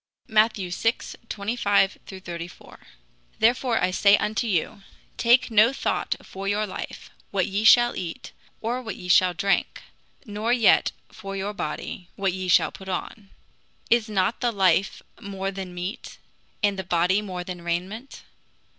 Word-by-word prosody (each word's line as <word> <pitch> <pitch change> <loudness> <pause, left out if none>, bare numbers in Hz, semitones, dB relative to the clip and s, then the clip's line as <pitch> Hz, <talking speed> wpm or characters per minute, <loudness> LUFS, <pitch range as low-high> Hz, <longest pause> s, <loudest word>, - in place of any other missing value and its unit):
] - - -45
Matt. 220 -1 +3
vi. 185 -3 -5
25 205 -1 0
34: 175 -2 -9 0.6
"Therefore 240 +1 +2
I 180 - +1
say 200 +2 +5
unto 220 +3 -1
you, 195 0 -1 0.4
Take 240 +1 +4
no 220 +2 +6
thought 270 - -1
for 195 +1 -7
your 210 +2 +1
life, 190 - -8 0.2
what 190 -3 0
ye 200 +2 -2
shall 240 +2 +6
eat, 170 -3 -6 0.3
or 240 +3 -2
what 220 -6 -6
ye 180 - -9
shall 180 0 +4
drink; 200 -1 0 0.4
nor 215 +1 -2
yet 240 -4 +4 0.2
for 195 -2 -8
your 195 +2 -3
body, 175 0 -5
what 195 -2 0
ye 185 0 -4
shall 175 - +4
put 190 0 -10
on. 195 +2 -5 0.6
Is 235 -1 +3
not 205 +2 0
the 240 -2 +1
life 195 -1 +2 0.2
more 195 -2 -4
than 190 -2 -6
meat, 180 +5 -6 0.5
and 200 -2 +2
the - - -2
body 180 +3 +2
than 180 -3 -6
rainment? 185 +9 -4
200 Hz, 150 wpm, -25 LUFS, 185-220 Hz, 0.6 s, no